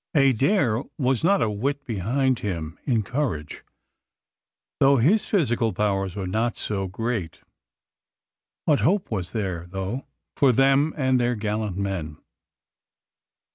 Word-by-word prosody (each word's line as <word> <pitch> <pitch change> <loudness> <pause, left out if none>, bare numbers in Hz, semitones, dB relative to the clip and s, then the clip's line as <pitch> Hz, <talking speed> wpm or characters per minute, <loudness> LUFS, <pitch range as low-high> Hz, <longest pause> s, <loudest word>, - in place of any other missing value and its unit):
Adair 135 - +3 0.2
was 130 -2 +1
not 195 +3 +4
a 110 - +1
whit 140 +7 -2
behind 125 +4 0
him 85 -5 -4
in 115 -5 +1
courage, 110 - -3 1.2
though 135 0 +5
his 170 - +3
physical 120 - +1
powers 95 -3 -1
were 100 -2 -3
not 110 +5 -1
so 95 -2 -2
great. 110 -2 -3 1.2
What 150 -3 +3
hope 190 -3 +1
was 90 -5 -2
there 95 -6 -3
though 95 +8 -4 0.3
for 135 -2 +4
them 135 +4 +4
and 130 -3 +2
their 120 0 +1
gallant 105 -2 -2
men? 95 -6 -3
115 Hz, 125 wpm, -24 LUFS, 95-135 Hz, 1.2 s, though